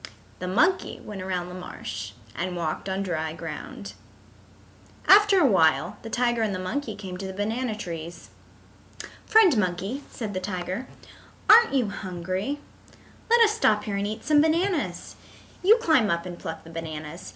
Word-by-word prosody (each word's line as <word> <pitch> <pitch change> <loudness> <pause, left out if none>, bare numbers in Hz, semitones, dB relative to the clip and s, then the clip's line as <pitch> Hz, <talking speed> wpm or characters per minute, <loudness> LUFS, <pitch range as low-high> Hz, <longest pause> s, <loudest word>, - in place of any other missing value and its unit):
The 180 - -4
monkey 310 - +1
went 205 -3 -8
around 180 -2 -3
the - - -9
marsh 110 - -7 0.2
and 180 +2 -3
walked 170 +2 -3
on 190 +1 -1
dry 160 -4 -2
ground. - - -7 1.1
After 405 -1 +7
a 330 - +5
while 175 -10 +3
the 225 - -8
tiger 240 -1 +1
and 210 -3 0
the - - -2
monkey 215 +5 -3
came 190 -3 -7
to 195 - -4
the 190 - -6
banana 220 +3 -2
trees. 170 -4 -7 1.0
"Friend 425 - +6
Monkey," 195 +7 -1
said 215 -4 -5
the 185 - -2
tiger, 185 +4 -4 0.6
"aren't 455 -8 +7
you 245 -6 +2
hungry? 185 +7 -4 0.7
Let 470 +1 +6
us 440 -2 +6
stop 215 - +2
here 205 - -3
and 200 +1 -1
eat 215 +1 -5
some 295 0 +5
bananas. 335 +2 0 0.4
You 425 +5 +6
climb 315 - +3
up 170 +1 0
and 175 -1 -7
pluck 160 0 -6
the 165 - -12
bananas. 160 0 -7
200 Hz, 160 wpm, -26 LUFS, 180-275 Hz, 1.1 s, After